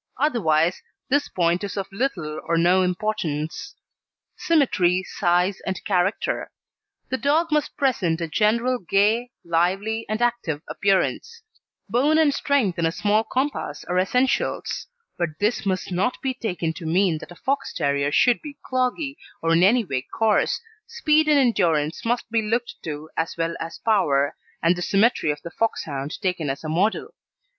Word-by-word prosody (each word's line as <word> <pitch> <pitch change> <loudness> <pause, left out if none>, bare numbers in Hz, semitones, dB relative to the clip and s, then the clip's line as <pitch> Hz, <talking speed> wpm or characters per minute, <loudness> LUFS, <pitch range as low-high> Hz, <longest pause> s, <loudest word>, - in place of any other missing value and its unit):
Otherwise 175 - +2 0.3
this 290 +2 +1
point 175 +1 +1
is 200 - -5
of 195 - -1
little 185 - -2
or 170 0 +1
no 175 +3 +4
importance. 180 -5 -2 0.6
SYMMETRY, 210 - +2
SIZE, 180 +1 0
AND 190 +3 -3
CHARACTER 190 -1 0 0.6
The 260 - -1
dog 315 +4 +2
must 300 -1 0
present 190 -12 +1
a 165 - -2
general 230 +8 +1
gay, 210 +6 +2 0.2
lively, 190 +7 0
and 215 0 -1
active 235 -11 -1
appearance; 200 - 0 0.4
bone 265 +9 +2
and 310 -3 +4
strength 255 -13 +1
in 165 - +2
a - - 0
small 210 +4 +1
compass 260 - -2
are 180 +1 0
essentials; 250 +8 0 0.3
but 160 -3 -2
this 210 0 0
must 185 -1 -1
not 185 +8 0
be 265 -1 0
taken 175 -9 -3
to 165 0 -7
mean 175 -1 +2
that - - -11
a - - -10
Fox 275 +7 -2
terrier 140 -2 0
should 245 - +3
be 295 -2 -9
cloggy, 260 +3 -1 0.3
or 165 0 +3
in 165 - +4
any 225 +5 +4
way 135 -7 -2
coarse 215 +10 +1 0.3
speed 315 -10 +2
and 300 -1 +5
endurance 170 - +2
must 235 +1 -1
be 230 -1 +2
looked 230 +3 -1
to 155 -1 -5
as 165 +1 -2
well 165 0 -1
as 165 - -6
power, 145 -10 +2 0.3
and 170 +2 +4
the 175 - -5
symmetry 200 -2 +2
of 145 0 -2
the 170 - -7
Foxhound 145 -11 -2
taken 180 -6 -1
as 135 +3 -4
a 155 - -4
model. 185 +8 0
195 Hz, 160 wpm, -23 LUFS, 165-245 Hz, 0.6 s, and